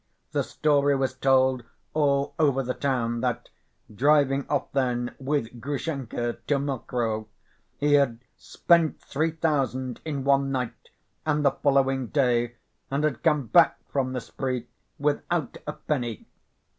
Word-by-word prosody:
The - - +1
story 145 -2 +2
was 135 -1 0
told 130 -1 +3 0.3
all 140 -2 +1
over 140 -4 +3
the 125 0 -2
town 120 -4 -1
that, 120 -1 -2 0.4
driving 140 +2 +3
off - - -1
then 125 -3 0
with 130 -4 -2
Grushenka 135 -4 -3
to 145 - +3
Mokroe, 120 -5 -2 0.5
he 145 0 +2
had 140 -5 +4 0.2
"spent 170 -3 +2
three 155 +4 -1
thousand 135 -6 -1
in 145 -4 -3
one 140 0 +3
night 125 -3 -4 0.3
and 150 -1 +1
the 140 - +6
following 135 -2 +1
day, 120 -3 +1 0.3
and 140 +2 -1
had 155 -3 0
come 150 -4 +2
back 170 +8 +5
from 130 -2 0
the 125 - -2
spree 130 -2 -3 0.3
without 150 0 -1
a 150 - -2
penny." 120 -9 -3
135 Hz, 135 wpm, -26 LUFS, 125-145 Hz, 0.5 s, the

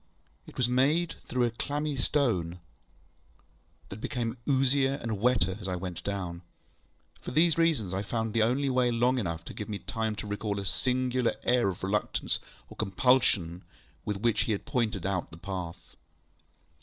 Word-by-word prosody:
It - - -13
was 125 - +3
made 145 +7 +3
through 125 0 +1
a 120 - +2
clammy 145 +5 -2
stone, 115 - +1 1.3
that 100 +2 -8
became 120 -1 -2
oozier 135 0 +3
and 115 -6 -3
wetter 105 -6 +3
as 100 - -5
I 95 - -1
went 90 -1 -5
down. 90 -4 -3 0.8
For - - -7
these 160 +4 +4
reasons, 145 - +2
I 95 - 0
found 110 +1 -2
the 115 - +3 0.3
way 125 -1 +3
long 120 +2 +2
enough 85 -5 -3
to - - -7
give 105 - -6
me 105 - -2
time 110 +4 -2
to 105 - -6
recall 105 0 -2
a 100 - -4
singular 125 +2 +1
air 120 -3 +3
of 95 - -6
reluctance 100 +2 0 0.3
or - - -12
compulsion 95 -5 +2 0.4
with 105 -1 -2
which 115 +2 +2
he 110 - +1
had 100 - -4
pointed 115 - 0
out 95 -2 -1
the 80 - -11
path. 90 -2 -6
110 Hz, 165 wpm, -29 LUFS, 95-125 Hz, 1.3 s, these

